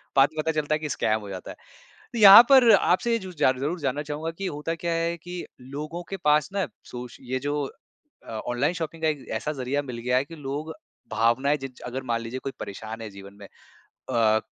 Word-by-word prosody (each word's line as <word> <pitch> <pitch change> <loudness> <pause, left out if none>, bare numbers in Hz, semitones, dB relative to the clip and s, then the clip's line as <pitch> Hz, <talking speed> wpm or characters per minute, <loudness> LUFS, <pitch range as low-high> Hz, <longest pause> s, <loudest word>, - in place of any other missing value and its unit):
बाद 135 +1 +6
में 155 - -1
पता 160 - +1
चलता 155 0 +1
है - - -3
कि 155 -1 -4
स्कैम 110 0 +1
हो 100 - -9
जाता 95 -1 -7
है। - - -10 0.6
तो 230 - -2
यहाँ 205 +3 +11
पर 255 -4 +8
आपसे 195 +6 +2
ये 230 - +2
जू 185 - -7
जार 130 0 +3
ज़रूर 160 +6 -2
जानना 140 0 -1
चाहूँगा 155 +3 -3
कि - - -1
होता 155 +3 -3
क्या 170 -1 -1
है 165 +1 0
कि 175 +2 -9 0.4
लोगों 155 +4 -5
के 195 - -4
पास 150 +2 +4
ना 195 -1 0 0.2
सोच 125 0 -8
ये 130 - 0
जो 145 +1 0 0.7
अ, - - -8
ऑनलाइन 120 +8 -1
शॉपिंग 160 0 -5
का - - +4
एक 145 -3 -4
ऐसा 150 - -3
ज़रिया 140 +3 0
मिल 120 - -6
गया 125 +2 +1
है 135 - +1
कि - - -7
लोग 155 +3 -4 0.4
भावनाएँ 120 +7 +2
जिज 135 -2 -9
अगर 130 +1 -4
मान 115 0 0
लीजिए 120 +3 -5
कोई 135 - -3
परेशान 110 +3 -7
है 110 - -6
जीवन 100 0 -12
में 100 - -10 0.6
अ, 110 -1 +3
145 Hz, 225 wpm, -25 LUFS, 120-165 Hz, 0.7 s, यहाँ